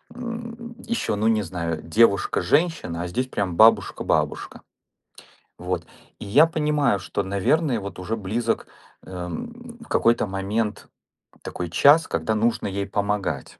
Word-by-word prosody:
м, 235 Hz, -1 st, -7 dB
еще, 235 Hz, -, -2 dB
ну, 105 Hz, +2 st, 0 dB
не 110 Hz, -1 st, +3 dB
знаю, 85 Hz, -3 st, -4 dB
девушка-женщина. 115 Hz, -, +2 dB
А -, -, -4 dB
здесь 125 Hz, +9 st, -2 dB
прям 95 Hz, -8 st, -3 dB
бабушка-бабушка. 110 Hz, +1 st, +2 dB, 1.0 s
Вот, 90 Hz, -1 st, -3 dB, 0.4 s
и -, -, -6 dB
я 140 Hz, +11 st, +6 dB
понимаю, 150 Hz, -9 st, +1 dB
что, 100 Hz, +2 st, -3 dB
наверное, 115 Hz, -, +1 dB
вот 100 Hz, -1 st, -8 dB
уже 100 Hz, +5 st, -3 dB
близок, 115 Hz, +3 st, -2 dB, 0.4 s
а, 90 Hz, -1 st, -6 dB
м, 240 Hz, -, -8 dB
в -, -, -19 dB
какой-то 115 Hz, -1 st, +2 dB
момент 105 Hz, +3 st, -2 dB, 0.6 s
такой 90 Hz, -1 st, -5 dB
час, 145 Hz, -, +5 dB
когда 110 Hz, -, -1 dB
нужно 115 Hz, +2 st, 0 dB
ей 100 Hz, 0 st, -3 dB
помогать. 100 Hz, -7 st, -2 dB
110 Hz, 130 wpm, -23 LUFS, 95-150 Hz, 1.0 s, я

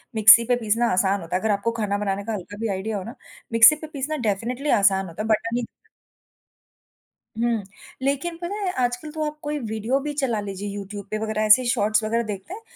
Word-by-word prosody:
Mixie 220 Hz, +2 st, +8 dB
पे 245 Hz, +1 st, +2 dB
पीसना 230 Hz, 0 st, 0 dB
आसान 195 Hz, +1 st, +1 dB
होता 170 Hz, +2 st, -4 dB
है, 185 Hz, -, 0 dB
अगर 220 Hz, -, +1 dB
आपको 205 Hz, +3 st, 0 dB
खाना 205 Hz, -2 st, 0 dB
बनाने 200 Hz, -1 st, -2 dB
का 225 Hz, +2 st, -4 dB
हल्का 205 Hz, +1 st, -7 dB
भी 225 Hz, -, 0 dB
आइडिया 205 Hz, +3 st, -3 dB
हो 190 Hz, -, -5 dB
ना, 230 Hz, -, -9 dB, 0.4 s
मिक्सी 230 Hz, +6 st, +8 dB
पे 310 Hz, +1 st, -9 dB
पीसना 295 Hz, +3 st, -3 dB
डेफिनिटली 245 Hz, +8 st, -2 dB
आसान 195 Hz, -1 st, +3 dB
होता 170 Hz, +5 st, -7 dB
है। 220 Hz, -, -3 dB
बट 220 Hz, +1 st, +1 dB
अभी 240 Hz, 0 st, -1 dB, 1.8 s
हुँ, 235 Hz, -3 st, 0 dB, 0.4 s
लेकिन 280 Hz, +5 st, -1 dB
पता 350 Hz, +4 st, -4 dB
है 395 Hz, -3 st, -2 dB
आजकल 245 Hz, +5 st, -2 dB
तो 310 Hz, 0 st, -3 dB
आप 300 Hz, 0 st, -5 dB
कोई 295 Hz, 0 st, -2 dB
वीडियो 220 Hz, +3 st, -1 dB
भी 295 Hz, +1 st, -4 dB
चला 235 Hz, -5 st, 0 dB
लीजिए 200 Hz, 0 st, -5 dB
यूट्यूब 200 Hz, 0 st, -7 dB
पे 215 Hz, -, -1 dB
वगैरह 215 Hz, 0 st, -1 dB
ऐसे 240 Hz, +4 st, +6 dB
शॉर्ट्स 215 Hz, -2 st, +1 dB
वगैरह 230 Hz, +2 st, 0 dB
देखते 210 Hz, -, -6 dB
हैं, 430 Hz, -, -8 dB
220 Hz, 210 wpm, -23 LUFS, 205-255 Hz, 1.8 s, मिक्सी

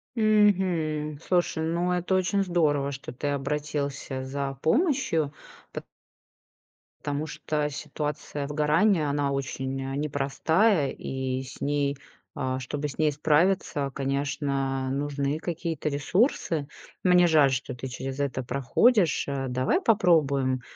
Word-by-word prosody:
Мгм. 185 Hz, -, +2 dB
Слушай, 175 Hz, -2 st, 0 dB
ну, 170 Hz, +2 st, 0 dB
это 180 Hz, +1 st, 0 dB
очень 190 Hz, +2 st, +1 dB
здорово, 150 Hz, -6 st, +1 dB
что 135 Hz, 0 st, -7 dB
ты 140 Hz, +4 st, -4 dB
обратился 140 Hz, -1 st, -2 dB
за 135 Hz, 0 st, -3 dB
помощью, 250 Hz, -, +1 dB, 0.4 s
пот -, -, -7 dB, 1.2 s
потому 145 Hz, +2 st, -2 dB
что 150 Hz, -1 st, -2 dB
ситуация 150 Hz, -1 st, -4 dB
выгорания, 150 Hz, +3 st, +2 dB
она 140 Hz, -1 st, 0 dB
очень, 135 Hz, 0 st, -3 dB
э, 135 Hz, 0 st, -4 dB
непростая, 150 Hz, +5 st, +1 dB
и 130 Hz, -1 st, -3 dB
с 135 Hz, -, -11 dB
ней, 145 Hz, -1 st, 0 dB, 0.4 s
э, 130 Hz, 0 st, -2 dB
чтобы 145 Hz, +3 st, -4 dB
с -, -, -10 dB
ней 155 Hz, -1 st, +3 dB
справиться, 150 Hz, -1 st, +1 dB
конечно, 140 Hz, -1 st, -1 dB
нужны 140 Hz, +1 st, -1 dB
какие-то 165 Hz, -2 st, -3 dB
ресурсы. 155 Hz, -, 0 dB, 0.4 s
Мне 180 Hz, -1 st, +6 dB
жаль, 150 Hz, -4 st, +5 dB
что 130 Hz, +1 st, -2 dB
ты 125 Hz, +2 st, -6 dB
через 130 Hz, +2 st, -5 dB
это 135 Hz, -2 st, -1 dB
проходишь. 155 Hz, -, +2 dB
Э, 135 Hz, -1 st, -2 dB
давай 130 Hz, +1 st, +1 dB
попробуем, 140 Hz, -, +3 dB
145 Hz, 120 wpm, -27 LUFS, 135-165 Hz, 1.2 s, Мне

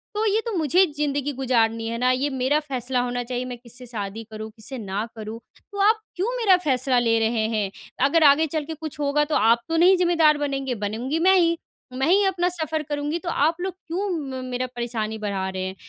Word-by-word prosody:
तो 430 Hz, +1 st, 0 dB
ये 440 Hz, -, +2 dB
तो 465 Hz, -, -2 dB
मुझे 340 Hz, +4 st, +4 dB
ज़िंदगी 290 Hz, -1 st, -1 dB
गुज़ारनी 230 Hz, -4 st, +1 dB
है 230 Hz, +1 st, -3 dB
ना, 250 Hz, +1 st, +2 dB
ये 260 Hz, +3 st, 0 dB
मेरा 265 Hz, +2 st, +1 dB
फ़ैसला 260 Hz, -4 st, -2 dB
होना 245 Hz, 0 st, -2 dB
चाहिए, 250 Hz, +1 st, -3 dB
मैं 250 Hz, -1 st, -6 dB
किससे 245 Hz, +1 st, -10 dB
शादी 220 Hz, -2 st, -5 dB
करूँ, 215 Hz, 0 st, -6 dB
किससे 230 Hz, +4 st, -8 dB
ना 205 Hz, -1 st, -3 dB
करूँ। 220 Hz, +1 st, -7 dB, 0.3 s
तो 405 Hz, -, -7 dB
आप 440 Hz, 0 st, +2 dB, 0.2 s
क्यों 435 Hz, +8 st, -1 dB
मेरा 405 Hz, -6 st, +5 dB
फ़ैसला 260 Hz, -2 st, +2 dB
ले 230 Hz, -1 st, +2 dB
रहे 225 Hz, 0 st, +1 dB
हैं? 205 Hz, -2 st, 0 dB, 0.4 s
अगर 320 Hz, +4 st, +3 dB
आगे 290 Hz, +2 st, +6 dB
चल 310 Hz, 0 st, -2 dB
के 320 Hz, -, -5 dB
कुछ 315 Hz, -1 st, -8 dB
होगा, 290 Hz, +1 st, +2 dB
तो 300 Hz, -, -1 dB
आप 230 Hz, +1 st, +4 dB
तो 325 Hz, -, +1 dB
नहीं 365 Hz, +3 st, +6 dB
ज़िम्मेदार 330 Hz, -4 st, +4 dB
बनेंगे, 275 Hz, -3 st, -2 dB
बनूँगी 225 Hz, +8 st, -2 dB
मैं 375 Hz, +3 st, +5 dB
ही। 335 Hz, -1 st, +2 dB, 0.4 s
मैं 265 Hz, +2 st, 0 dB
ही 390 Hz, +4 st, +5 dB
अपना 360 Hz, -2 st, +1 dB
सफ़र 315 Hz, -3 st, -2 dB
करूँगी, 295 Hz, +2 st, -2 dB
तो 345 Hz, -, -5 dB
आप 320 Hz, 0 st, +2 dB
लोग 375 Hz, 0 st, -2 dB
क्यों 375 Hz, +2 st, -4 dB, 0.2 s
म 260 Hz, -1 st, -5 dB
मेरा 255 Hz, 0 st, -2 dB
परेशानी 225 Hz, -2 st, -3 dB
बढ़ा 200 Hz, -3 st, -2 dB
रहे 190 Hz, 0 st, -4 dB
हैं? 190 Hz, 0 st, -5 dB
270 Hz, 220 wpm, -24 LUFS, 230-320 Hz, 0.4 s, आगे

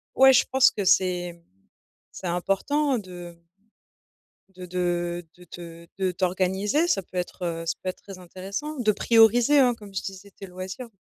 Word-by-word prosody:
ouais 265 Hz, 0 st, +7 dB
je 255 Hz, -, +5 dB
pense 265 Hz, 0 st, +6 dB
que 205 Hz, -, -4 dB
c'est 180 Hz, -2 st, +1 dB, 0.7 s
c'est 185 Hz, -, -7 dB
important 245 Hz, +11 st, 0 dB
de 175 Hz, -3 st, -11 dB, 1.1 s
de 180 Hz, 0 st, -8 dB
de 175 Hz, -1 st, -2 dB
de 180 Hz, -, -16 dB
te 170 Hz, 0 st, -11 dB
de 190 Hz, -1 st, 0 dB
t'organiser 190 Hz, -, 0 dB
ça 200 Hz, -, +1 dB
peut 185 Hz, -, -18 dB
être, 180 Hz, +1 st, -4 dB
heu, 165 Hz, -1 st, -3 dB
ça 165 Hz, -, 0 dB
peut 185 Hz, -, -3 dB
être 185 Hz, -, -7 dB
très 195 Hz, -2 st, -10 dB
intéressant 195 Hz, -, -6 dB
de 215 Hz, -3 st, +3 dB
prioriser 230 Hz, +6 st, +4 dB
hein 250 Hz, -2 st, +4 dB
comme 205 Hz, -3 st, -13 dB
je 195 Hz, -, -2 dB
disais 195 Hz, +1 st, -9 dB
tes 195 Hz, -, -11 dB
loisirs. 190 Hz, +6 st, -7 dB
190 Hz, 170 wpm, -25 LUFS, 175-225 Hz, 1.1 s, ouais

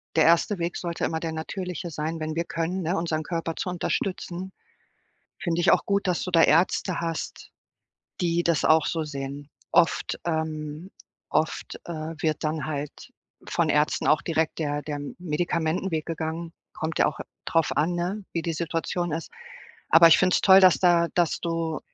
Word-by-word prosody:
der 160 Hz, -, +5 dB
erste 170 Hz, +4 st, +3 dB
Weg 170 Hz, 0 st, -2 dB
sollte 170 Hz, -1 st, -3 dB
immer 160 Hz, -, -1 dB
der 160 Hz, -1 st, -4 dB
Natürliche 175 Hz, +2 st, -5 dB
sein, 160 Hz, +1 st, -4 dB
wenn 155 Hz, 0 st, -3 dB
wir 170 Hz, +1 st, -1 dB
können, 170 Hz, +3 st, -2 dB
ne, 170 Hz, +3 st, 0 dB
unseren 165 Hz, -2 st, -1 dB
Körper 165 Hz, 0 st, -3 dB
zu -, -, -3 dB
unterstützen. 180 Hz, +1 st, -3 dB, 0.9 s
Finde 170 Hz, -2 st, 0 dB
ich 175 Hz, -, +5 dB
auch -, -, +3 dB
gut, 200 Hz, 0 st, 0 dB
dass 180 Hz, -2 st, 0 dB
du 180 Hz, -, -4 dB
da 165 Hz, -2 st, +6 dB
Ärzte 170 Hz, +2 st, +2 dB
hast, 165 Hz, -1 st, -4 dB, 0.7 s
die 170 Hz, 0 st, +1 dB
das 170 Hz, -3 st, +1 dB
auch 155 Hz, -1 st, +5 dB
so 165 Hz, -2 st, -1 dB
sehen. 140 Hz, 0 st, -6 dB, 0.2 s
Oft, 175 Hz, -1 st, +2 dB
ähm 160 Hz, +1 st, -3 dB, 0.4 s
oft, 160 Hz, -, -1 dB
äh, 175 Hz, -, -6 dB, 0.3 s
wird 155 Hz, 0 st, -1 dB
dann 155 Hz, -1 st, -1 dB
halt 145 Hz, -1 st, -6 dB, 0.3 s
von 170 Hz, -2 st, 0 dB
Ärzten 150 Hz, 0 st, +1 dB
auch 150 Hz, -, +4 dB
direkt 160 Hz, -1 st, -1 dB
der 145 Hz, -2 st, -1 dB
der 150 Hz, -1 st, -4 dB
M 145 Hz, 0 st, -7 dB
Medikamentenweg 165 Hz, 0 st, -1 dB
gegangen. 165 Hz, 0 st, -4 dB, 0.2 s
Kommt 160 Hz, +1 st, -4 dB
ja -, -, +5 dB
auch -, -, -2 dB, 0.3 s
drauf 165 Hz, -3 st, +1 dB
an, 155 Hz, +5 st, +2 dB
ne, 180 Hz, +4 st, -3 dB
wie 165 Hz, -, -1 dB
die 165 Hz, 0 st, -2 dB
Situation 165 Hz, +1 st, -2 dB
ist. 160 Hz, 0 st, -4 dB, 0.6 s
Aber 165 Hz, +1 st, +8 dB
ich 165 Hz, -, +7 dB
finde 185 Hz, -1 st, +3 dB
es -, -, +3 dB
toll, 190 Hz, 0 st, +8 dB
dass 185 Hz, -2 st, +6 dB
da 175 Hz, -2 st, +4 dB
dass 175 Hz, -3 st, +1 dB
du 165 Hz, -2 st, -2 dB
165 Hz, 180 wpm, -26 LUFS, 155-175 Hz, 0.9 s, Aber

